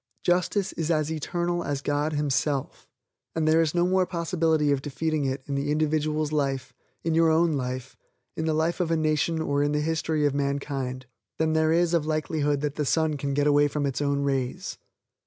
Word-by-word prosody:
Justice 180 +2 +1
is 160 -1 -3
as 155 -2 +1
eternal 175 +2 -2
as 140 0 -3
God 145 +2 0
Himself, 145 -1 -1 0.5
and 160 -1 +1
there 160 +1 +5
is 160 0 0
no 175 0 +3
more 185 0 +2
possibility 165 -3 +1
of 140 -1 +1
defeating 155 +1 -1
it 130 0 -2
in 140 - -4
the 140 +1 -1
individual's 155 0 0
life, 135 -4 -1 0.3
in 165 - 0
your 165 0 +4
own 160 +1 +3
life, 130 -1 -4 0.4
in 160 - -2
the 160 - +1
life 160 +3 0
of 175 -3 0
a 165 - +2
nation 155 +1 +1
or 145 -2 0
in 145 +1 +1
the 150 - +1
history 155 -1 0
of 145 - +2
mankind, 140 -2 -2 0.3
than 160 0 +1
there 160 0 +3
is 170 +1 +2
likelihood 155 -2 0
that 150 -1 -3
the 150 - 0
sun 160 +1 +1
can 140 -1 -2
get 145 0 +2
away 145 0 +4
from 145 0 -2
its 135 -1 -2
own 140 -1 +1
rays. 135 +6 -2
150 Hz, 195 wpm, -26 LUFS, 140-160 Hz, 0.5 s, there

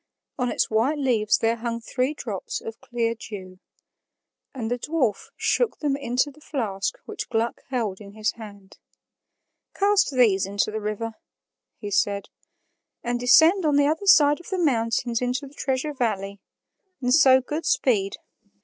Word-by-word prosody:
On 250 -1 +1
its - - +1
white 230 +8 +1
leaves 235 -7 +2
there 230 +1 +1
hung 230 0 -3
three 255 +5 -2
drops 210 -9 -5
of 225 0 -9
clear 230 -1 -1
dew. 190 -5 -9 0.9
And 235 -4 -5
the 245 - -1
dwarf 260 -8 -1
shook 485 -3 +1
them 290 -3 0
into 265 +1 0
the 305 - -20
flask 205 - -3
which - - -6
Gluck 230 0 -1
held 220 -7 -2
in 200 -1 -11
his 215 0 -1
hand. 205 -3 -13 1.0
"Cast 405 0 +3
these 225 -8 +3
into 200 +2 -1
the 220 0 -4
river," 215 +2 -3 0.6
he 205 -2 -7
said, 200 0 0 0.7
"and 240 0 -1
descend 320 +10 +5
on 300 -2 +2
the 285 0 +4
other 320 +7 -1
side 295 -4 +6
of 350 - -12
the 380 - -2
mountains 235 -6 0
into 250 +3 -1
the 275 - -13
Treasure 275 +1 -2
Valley. 200 -6 -2 0.6
And 250 -1 +1
so 265 -4 +7
good 295 +5 -4
speed." 200 -6 +1
240 Hz, 160 wpm, -24 LUFS, 215-280 Hz, 1.0 s, so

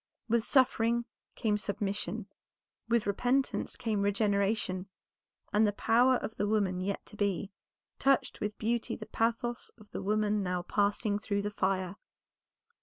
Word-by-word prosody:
With 230 -1 +2
suffering 235 -3 +3 0.3
came 210 -2 +1
submission, 205 0 -2 0.6
with 235 -2 +3
repentance 245 +7 0
came 215 -3 -1
regeneration, 200 -2 +1 0.7
and 210 +1 +5
the 205 - 0
power 245 +5 +4
of 225 -2 -4
the 205 - 0
woman 200 -4 +1
yet 195 +1 -3
to - - -13
be, 200 -1 -1 0.5
touched 275 0 +2
with 210 -1 -2
beauty 230 +1 -1
the - - -8
pathos 235 +1 -1
of 210 -2 -18
the - - -4
woman 210 +1 +1
now 180 -2 -1
passing 205 +1 +1
through 200 -1 -1
the 205 - -2
fire. 190 -1 -1
210 Hz, 140 wpm, -31 LUFS, 200-230 Hz, 0.7 s, and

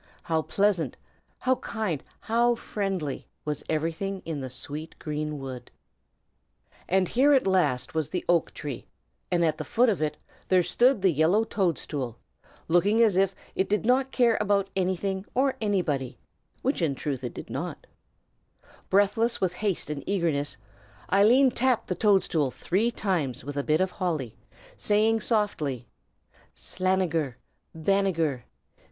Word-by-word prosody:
How 160 -1 +1
pleasant, 170 - 0 0.4
how 255 0 +2
kind, 200 - -3 0.2
how 235 +2 +2
friendly 195 - -3 0.2
was 150 -1 -3
everything 165 +5 -2
in 160 -3 -3
the 130 - -5
sweet 150 +5 -7
green 150 0 -3
wood! 130 -2 -7 1.2
And 190 0 +3
here 275 +8 +4
at 270 - +4
last 185 -10 +1
was 160 -2 -1
the 180 +2 -3
oak 170 -2 +2
tree, 145 -5 -6 0.4
and 170 -1 +2
at 155 -1 0
the - - -2
foot 245 +1 +3
of 200 -7 0
it 150 -1 -1 0.3
there 185 -1 +4
stood 230 +5 +3
the 190 - +5
yellow 165 +8 +3
toadstool, 150 - -2 0.5
looking 195 +6 +3
as 215 -5 +3
if 195 0 +2 0.2
it 190 - 0
did 210 +1 +1
not 260 +2 +3
care 235 -3 +3
about 200 -1 +1
anything 190 +1 -1
or 265 +1 +2
anybody, 155 - -1 0.5
which 270 -6 0
in 150 -5 +1
truth 135 -2 -3
it 125 - -5
did - - -8
not: - - -5 1.0
Breathless 215 +4 +2
with 185 -2 0
haste 190 -5 -2
and 145 -2 -4
eagerness, 160 - 0 0.6
Eileen 245 +7 +6
tapped 250 -1 +1
the - - +1
toadstool 180 -7 +2
three 195 - 0
times 175 - -1
with 145 +2 -6
a 140 - -1
bit 155 +2 +2
of 185 0 +1
holly, 155 - -2 0.4
saying 220 +2 +2
softly, 180 - -1 0.7
"Slanegher 180 -7 0 0.4
Banegher! 165 - +1
185 Hz, 145 wpm, -27 LUFS, 150-210 Hz, 1.2 s, Eileen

